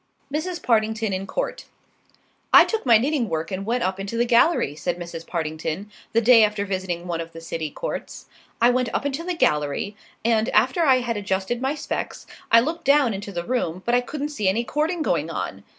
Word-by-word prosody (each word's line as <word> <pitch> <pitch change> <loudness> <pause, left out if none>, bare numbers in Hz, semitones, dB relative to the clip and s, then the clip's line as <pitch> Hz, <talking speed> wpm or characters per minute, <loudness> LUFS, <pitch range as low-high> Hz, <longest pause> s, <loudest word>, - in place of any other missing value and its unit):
MRS. 340 +3 -3
PARTINGTON 220 -2 +1
IN 190 +1 -3
COURT - - -3 0.9
"I - - +9
took 445 - -3
my 230 -2 +8
knitting 260 -1 0
work 160 +2 -3
and 195 +2 -4
went 240 +1 0
up 190 +1 -1
into 200 +4 -4
the 240 - +2
gallery," 235 - +3
said 175 +4 -3
Mrs. 170 -1 -8
Partington, 160 +4 -4 0.2
the 230 - +3
day 235 -1 +7
after 210 -1 0
visiting 185 -3 -3
one 170 -2 -2
of 165 0 -9
the 165 - -8
city 165 -1 -4
courts; - - -6 0.3
"I 240 +2 +5
went 250 -1 0
up - - -1
into 285 +3 -2
the 360 0 -2
gallery, 150 - 0 0.3
and 225 0 +2
after 350 - +2
I 260 -4 +4
had 235 -2 -2
adjusted 195 +4 -2
my 270 +3 0
specs, - - -4 0.3
I 230 0 +8
looked 315 +7 -3
down 280 -4 +4
into 200 +1 -6
the 170 -2 -4
room, 185 -7 -2
but 240 - 0
I 245 - +4
couldn't 290 +3 -4
see 215 -10 0
any 225 +5 0
courting 310 +6 -1
going 165 - 0
on. 100 -11 -5
220 Hz, 205 wpm, -23 LUFS, 180-255 Hz, 0.9 s, I